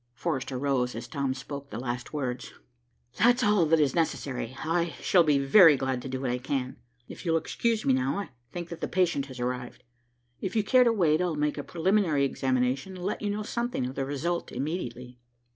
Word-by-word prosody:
Forrester 135 Hz, -3 st, -2 dB
rose 125 Hz, -3 st, 0 dB
as 115 Hz, +1 st, -6 dB
Tom 135 Hz, +1 st, -2 dB
spoke 140 Hz, +1 st, -7 dB
the 110 Hz, -, -6 dB
last 120 Hz, 0 st, -4 dB
words. 125 Hz, -5 st, -4 dB, 0.7 s
"That's 245 Hz, +4 st, +4 dB
all 205 Hz, -6 st, +4 dB
that 165 Hz, +1 st, +4 dB
is 145 Hz, -4 st, +2 dB
necessary. 130 Hz, -7 st, -2 dB
I 170 Hz, +1 st, 0 dB
shall 180 Hz, -, +4 dB
be 150 Hz, -3 st, +3 dB
very 150 Hz, +2 st, +7 dB
glad 130 Hz, -1 st, -2 dB
to 130 Hz, -, -7 dB
do 130 Hz, 0 st, -3 dB
what 130 Hz, -2 st, -1 dB
I 125 Hz, -, -1 dB
can. 130 Hz, 0 st, -3 dB, 0.3 s
If -, -, -10 dB
you'll 165 Hz, -3 st, +2 dB
excuse 225 Hz, +7 st, -1 dB
me 135 Hz, -, +4 dB
now, 130 Hz, +5 st, 0 dB
I 200 Hz, -, -4 dB, 0.2 s
think 175 Hz, -1 st, -6 dB
that 170 Hz, -, -8 dB
the -, -, -1 dB
patient 170 Hz, -7 st, +1 dB
has 130 Hz, -2 st, -10 dB
arrived. 125 Hz, 0 st, -4 dB, 0.6 s
If 190 Hz, -, -4 dB
you 215 Hz, -, +3 dB
care 250 Hz, +4 st, +5 dB
to 235 Hz, -, +5 dB
wait, 170 Hz, -7 st, +2 dB
I'll 175 Hz, -3 st, 0 dB
make 150 Hz, 0 st, -1 dB
a -, -, -3 dB
preliminary 170 Hz, -4 st, +2 dB
examination 130 Hz, +6 st, -1 dB
and 180 Hz, -1 st, -7 dB
let 200 Hz, -, -2 dB
you 210 Hz, -, -1 dB
know 210 Hz, +1 st, -2 dB
something 235 Hz, -, -2 dB
of 130 Hz, -, -4 dB
the 135 Hz, -, -2 dB
result 150 Hz, +6 st, -2 dB
immediately." 125 Hz, -4 st, -5 dB
145 Hz, 210 wpm, -28 LUFS, 130-175 Hz, 0.7 s, very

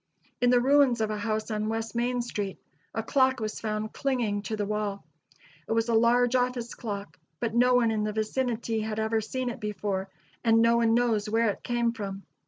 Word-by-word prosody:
In 245 Hz, -, +4 dB
the 245 Hz, 0 st, +5 dB
ruins 270 Hz, -1 st, +4 dB
of 220 Hz, -1 st, 0 dB
a 210 Hz, -, -2 dB
house 215 Hz, +1 st, -2 dB
on 215 Hz, 0 st, -1 dB
West 225 Hz, 0 st, -3 dB
Main 240 Hz, +1 st, 0 dB
street 205 Hz, -5 st, -4 dB, 0.3 s
a 225 Hz, -, -3 dB
clock 260 Hz, +2 st, +2 dB
was 215 Hz, -1 st, -3 dB
found 215 Hz, 0 st, -3 dB
clinging 240 Hz, -7 st, -1 dB
to 220 Hz, +1 st, -3 dB
the 205 Hz, -, -1 dB
wall. 210 Hz, -1 st, -3 dB, 0.6 s
It -, -, 0 dB
was 225 Hz, +1 st, +1 dB
a -, -, +2 dB
large 235 Hz, +2 st, +4 dB
[Illustration: 250 Hz, -1 st, +3 dB
ON 250 Hz, -, -10 dB
NINTH 240 Hz, -2 st, -3 dB
STREET, 240 Hz, -, -12 dB
LOUISVILLE.] 200 Hz, -1 st, -2 dB
office -, -, -19 dB
clock, 145 Hz, -, -29 dB, 0.2 s
but 230 Hz, -2 st, -2 dB
no 250 Hz, +2 st, +4 dB
one 235 Hz, -2 st, +3 dB
in 215 Hz, -1 st, 0 dB
the 215 Hz, -, -1 dB
vicinity 225 Hz, +1 st, -1 dB
had 215 Hz, 0 st, -3 dB
ever 220 Hz, 0 st, +1 dB
seen 250 Hz, +3 st, -3 dB
it 240 Hz, -, -8 dB
before, 200 Hz, -2 st, -3 dB, 0.3 s
and 225 Hz, -1 st, +4 dB
no 230 Hz, +1 st, +4 dB
one 230 Hz, -1 st, +3 dB
knows 230 Hz, -3 st, +1 dB
where 225 Hz, 0 st, +2 dB
it -, -, -10 dB
came 240 Hz, -1 st, 0 dB
from. 200 Hz, -3 st, -6 dB
225 Hz, 230 wpm, -28 LUFS, 215-240 Hz, 0.6 s, the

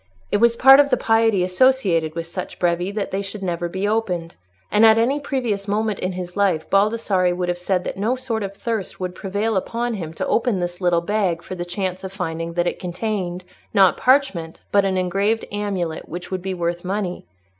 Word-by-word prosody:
It -, -, +3 dB
was 235 Hz, +2 st, +4 dB
part 270 Hz, +3 st, +8 dB
of 285 Hz, -1 st, +5 dB
the 250 Hz, -, +3 dB
piety 225 Hz, -4 st, +3 dB
associated 180 Hz, -6 st, +2 dB
with 165 Hz, -1 st, -3 dB
such 175 Hz, +2 st, -6 dB
brevi, 175 Hz, +1 st, 0 dB
that 205 Hz, -2 st, -2 dB
they 195 Hz, -, -1 dB
should 195 Hz, 0 st, -7 dB
never 175 Hz, -1 st, -2 dB
be 190 Hz, +3 st, -2 dB
opened, 180 Hz, -6 st, -1 dB, 0.4 s
and 210 Hz, -, +4 dB
at 220 Hz, 0 st, +7 dB
any 255 Hz, +6 st, +2 dB
previous 240 Hz, -8 st, -2 dB
moment 210 Hz, 0 st, 0 dB
in 185 Hz, +1 st, -2 dB
his 180 Hz, -1 st, -6 dB
life 195 Hz, -6 st, +1 dB
Baldassarre 195 Hz, -3 st, +2 dB
would 180 Hz, 0 st, -2 dB
have 175 Hz, -, -1 dB
said 180 Hz, 0 st, 0 dB
that -, -, -5 dB
no 220 Hz, +6 st, +1 dB
sort 250 Hz, -4 st, -3 dB
of 200 Hz, 0 st, -5 dB
thirst 225 Hz, -3 st, -3 dB
would 180 Hz, -1 st, -3 dB
prevail 205 Hz, +4 st, -2 dB
upon 235 Hz, +5 st, -1 dB
him 170 Hz, -7 st, -5 dB
to -, -, -2 dB
open 230 Hz, -5 st, +1 dB
this 175 Hz, +1 st, -4 dB
little 175 Hz, -2 st, +2 dB
bag 180 Hz, -2 st, 0 dB
for -, -, -7 dB
the 175 Hz, -1 st, -4 dB
chance 185 Hz, +1 st, -3 dB
of 190 Hz, -, -5 dB
finding 165 Hz, -3 st, -4 dB
that 175 Hz, 0 st, 0 dB
it -, -, -2 dB
contained, 180 Hz, -1 st, -3 dB, 0.3 s
not 195 Hz, -2 st, +6 dB
parchment, 250 Hz, -, +1 dB
but 200 Hz, -1 st, +4 dB
an 190 Hz, -1 st, 0 dB
engraved 195 Hz, +5 st, 0 dB
amulet 195 Hz, -6 st, -3 dB
which 175 Hz, +3 st, -7 dB
would 185 Hz, -1 st, -2 dB
be 190 Hz, 0 st, -3 dB
worth 175 Hz, 0 st, -2 dB
money. 185 Hz, -, -3 dB
195 Hz, 210 wpm, -21 LUFS, 175-220 Hz, 0.4 s, part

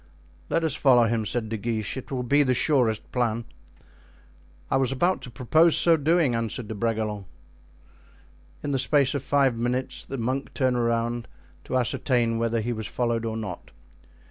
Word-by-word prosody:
"Let 165 Hz, -, +1 dB
us 160 Hz, -4 st, +1 dB
follow 125 Hz, -4 st, +4 dB
him," 115 Hz, -1 st, 0 dB
said 115 Hz, 0 st, -1 dB
De 110 Hz, -, -3 dB
Guiche; 110 Hz, 0 st, -3 dB
"it 130 Hz, -, -8 dB
will 130 Hz, -2 st, -2 dB
be 140 Hz, +4 st, +3 dB
the 130 Hz, -3 st, +2 dB
surest 125 Hz, -6 st, +1 dB
plan." 115 Hz, -2 st, -1 dB, 1.3 s
"I -, -, +3 dB
was 135 Hz, -1 st, +1 dB
about 175 Hz, +8 st, +1 dB
to -, -, -8 dB
propose 155 Hz, +8 st, +3 dB
so 170 Hz, -1 st, +5 dB
doing," 160 Hz, -2 st, +2 dB
answered 115 Hz, 0 st, -3 dB
De -, -, -3 dB
Bragelonne. 110 Hz, -2 st, -2 dB, 1.4 s
In 145 Hz, -, -2 dB
the 135 Hz, -, 0 dB
space 140 Hz, 0 st, +3 dB
of 140 Hz, -, -2 dB
five 135 Hz, -2 st, +2 dB
minutes 120 Hz, +3 st, -2 dB
the 135 Hz, -, -6 dB
monk 130 Hz, +3 st, -3 dB
turned 130 Hz, -2 st, +1 dB
around 115 Hz, 0 st, -1 dB, 0.4 s
to 130 Hz, -, -1 dB
ascertain 120 Hz, -2 st, +1 dB
whether 115 Hz, 0 st, 0 dB
he 120 Hz, +2 st, -2 dB
was 110 Hz, -2 st, -5 dB
followed 115 Hz, -2 st, -1 dB
or 110 Hz, 0 st, -3 dB
not. 100 Hz, -6 st, -6 dB
120 Hz, 170 wpm, -25 LUFS, 115-135 Hz, 1.4 s, so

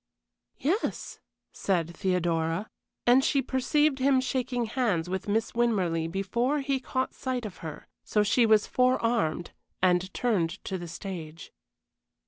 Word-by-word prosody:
"Yes," 360 Hz, -, -2 dB, 0.3 s
said 170 Hz, -3 st, -1 dB
Theodora, 175 Hz, 0 st, 0 dB, 0.3 s
and 250 Hz, +2 st, +6 dB
she 280 Hz, -, +2 dB
perceived 270 Hz, +2 st, +1 dB
him 265 Hz, 0 st, +4 dB
shaking 255 Hz, -2 st, -1 dB
hands 215 Hz, -8 st, 0 dB
with 190 Hz, +3 st, -3 dB
Miss 220 Hz, +2 st, 0 dB
Winmarleigh 185 Hz, -9 st, +1 dB
before 235 Hz, -, 0 dB
he 275 Hz, -1 st, 0 dB
caught 260 Hz, 0 st, -2 dB
sight 255 Hz, -3 st, -3 dB
of 205 Hz, -, -7 dB
her, 160 Hz, -2 st, -8 dB, 0.2 s
so 210 Hz, -, +2 dB
she 230 Hz, +3 st, +3 dB
was 215 Hz, -1 st, +5 dB
forearmed 230 Hz, -9 st, +1 dB, 0.3 s
and 185 Hz, 0 st, +2 dB
turned 200 Hz, -10 st, +1 dB
to 190 Hz, -2 st, -3 dB
the 175 Hz, -, -6 dB
stage. 165 Hz, -2 st, -7 dB
215 Hz, 130 wpm, -28 LUFS, 175-255 Hz, 0.3 s, and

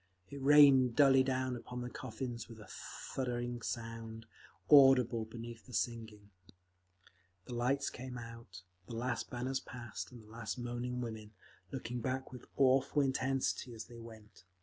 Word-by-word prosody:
It 140 Hz, -1 st, -7 dB
rained 135 Hz, -3 st, +7 dB
dully 135 Hz, -2 st, +7 dB
down 130 Hz, -1 st, 0 dB
upon 125 Hz, +1 st, -6 dB
the 125 Hz, -, -4 dB
coffins 120 Hz, -1 st, -5 dB
with 115 Hz, -1 st, -11 dB
a 105 Hz, -, -11 dB
thudding 120 Hz, -2 st, -4 dB
sound, 115 Hz, -1 st, -5 dB, 0.4 s
audible 130 Hz, -5 st, +7 dB
beneath 115 Hz, +1 st, -9 dB
the 125 Hz, -, -12 dB
singing…. 110 Hz, -4 st, -3 dB, 1.1 s
The -, -, -7 dB
lights 130 Hz, +4 st, +1 dB
came 125 Hz, 0 st, -7 dB
out. 115 Hz, -6 st, -10 dB, 0.2 s
The 115 Hz, -, -6 dB
last 120 Hz, +2 st, -2 dB
banners 130 Hz, +2 st, -2 dB
passed, 120 Hz, -3 st, -7 dB
and 120 Hz, -3 st, -12 dB
the -, -, -18 dB
last 115 Hz, +1 st, -5 dB
moaning 120 Hz, +1 st, -3 dB
women, 110 Hz, -2 st, -6 dB, 0.4 s
looking 125 Hz, -2 st, -4 dB
back 130 Hz, +2 st, -2 dB
with 125 Hz, -2 st, -10 dB
awful 135 Hz, +2 st, +4 dB
intensity 130 Hz, -2 st, 0 dB
as 110 Hz, -, -7 dB
they 120 Hz, -1 st, -12 dB
went. 110 Hz, -4 st, -13 dB
120 Hz, 150 wpm, -35 LUFS, 115-130 Hz, 1.1 s, rained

